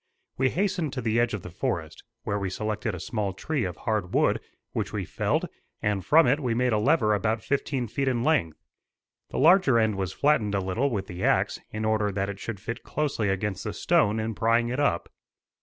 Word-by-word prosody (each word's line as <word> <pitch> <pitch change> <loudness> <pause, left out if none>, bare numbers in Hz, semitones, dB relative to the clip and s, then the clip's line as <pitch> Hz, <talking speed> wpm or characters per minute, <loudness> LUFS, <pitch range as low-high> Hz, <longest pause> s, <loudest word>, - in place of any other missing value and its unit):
We 130 0 +2
hastened 180 -5 -1
to 125 - -3
the 115 0 +1
edge 120 -2 +1
of 100 - -7
the 90 - -8
forest, 85 - -3 0.2
where 100 -2 -1
we 95 -1 -2
selected 105 +2 -2
a - - -7
small 105 -1 -2
tree 140 +6 -2
of 90 -1 -4
hard 105 -5 -2
wood, - - +3 0.3
which - - -3
we - - -3
felled; - - 0 0.3
and 105 -2 -1
from 155 - +6
it 135 +5 +3
we 125 -5 -1
made 125 0 +2
a 105 - +2
lever 115 -3 +3
about 110 +1 0
fifteen 135 -3 -1
feet 135 +5 -2
in 120 -3 +1
length. 125 - +1 0.7
The - - -5
larger 160 -5 +5
end 110 -3 +2
was 95 -1 -2
flattened 115 -6 +2
a - - +2
little 95 +9 0
with 100 -6 -2
the 90 0 -7
axe, - - +2
in 110 0 -4
order 110 -1 +1
that 100 0 -1
it 100 -1 -6
should 115 -2 -5
fit 115 +4 -5
closely 135 -8 -1
against 95 0 -2
the - - -4
stone 105 +2 +2
in 110 +1 -2
prying 115 +2 +2
it 125 +3 -2
up. 140 -13 +1
110 Hz, 215 wpm, -26 LUFS, 100-130 Hz, 0.7 s, from